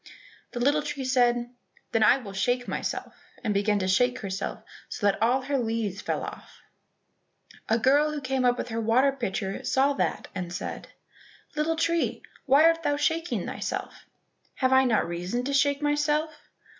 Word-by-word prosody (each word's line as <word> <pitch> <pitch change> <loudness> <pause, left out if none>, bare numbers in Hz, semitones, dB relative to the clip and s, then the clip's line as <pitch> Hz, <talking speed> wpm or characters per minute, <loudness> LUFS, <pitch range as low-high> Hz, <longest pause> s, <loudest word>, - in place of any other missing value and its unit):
The 240 - -4
little 285 +5 +3
tree 290 -2 -4
said, 245 -2 +2 0.4
"Then 225 - +1
I 215 - +6
will 210 -7 -9
shake 245 +5 0
myself," - - -4 0.3
and 210 - 0
began 205 +1 +2
to 185 -2 -1
shake 245 +7 +2
herself 195 -1 -5 0.3
so - - -4
that 200 0 +2
all 250 +4 +2
her 275 +1 0
leaves 225 -4 -2
fell - - -2
off; - - -10 1.1
a 225 - +4
girl 285 +6 +3
who 300 - -3
came 265 -1 -1
up 245 0 +3
with 245 - -4
her 225 0 -2
water 245 +5 +3
pitcher 205 -4 -3
saw 265 +3 +2
that, - - -2
and 180 -3 -5
said, 175 - -5 0.7
"Little 305 +2 0
tree, 335 +1 0 0.2
why 275 +3 +6
art 330 0 +4
thou 290 -3 0
shaking 325 +3 -1
thyself?" - - -5 0.5
"Have 260 -1 +2
I 265 0 +6
not 225 -7 +2
reason 180 +8 -3
to 280 +2 -2
shake 285 +1 +2
myself?" 295 +1 +1
255 Hz, 170 wpm, -27 LUFS, 220-285 Hz, 1.1 s, I